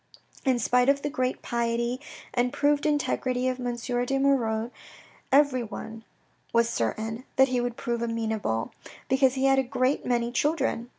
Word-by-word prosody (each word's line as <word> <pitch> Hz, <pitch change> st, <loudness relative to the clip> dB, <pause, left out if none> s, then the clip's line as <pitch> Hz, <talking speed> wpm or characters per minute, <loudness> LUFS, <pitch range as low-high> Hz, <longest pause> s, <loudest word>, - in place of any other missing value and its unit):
In 260 Hz, -2 st, +3 dB
spite 250 Hz, +2 st, +3 dB
of 280 Hz, 0 st, +2 dB
the 290 Hz, -, -2 dB
great 255 Hz, -3 st, -2 dB
piety 235 Hz, +1 st, -1 dB, 0.3 s
and 245 Hz, 0 st, +1 dB
proved 290 Hz, +1 st, +2 dB
integrity 255 Hz, -4 st, 0 dB
of 255 Hz, 0 st, -1 dB
M. 245 Hz, -1 st, -2 dB
de 245 Hz, +2 st, -1 dB
Moirod, 240 Hz, -5 st, +1 dB, 0.6 s
everyone 245 Hz, -5 st, +1 dB, 0.5 s
was 235 Hz, 0 st, +3 dB
certain 220 Hz, -, -2 dB
that 265 Hz, 0 st, +5 dB
he 250 Hz, -1 st, +1 dB
would 245 Hz, -1 st, -3 dB
prove 235 Hz, -1 st, -2 dB
amenable, 220 Hz, -, -2 dB, 0.4 s
because 265 Hz, 0 st, +3 dB
he 265 Hz, 0 st, +1 dB
had 270 Hz, 0 st, +5 dB
a -, -, +2 dB
great 255 Hz, +2 st, 0 dB
many 240 Hz, -1 st, 0 dB
children. 270 Hz, -4 st, 0 dB
250 Hz, 155 wpm, -27 LUFS, 235-270 Hz, 0.6 s, that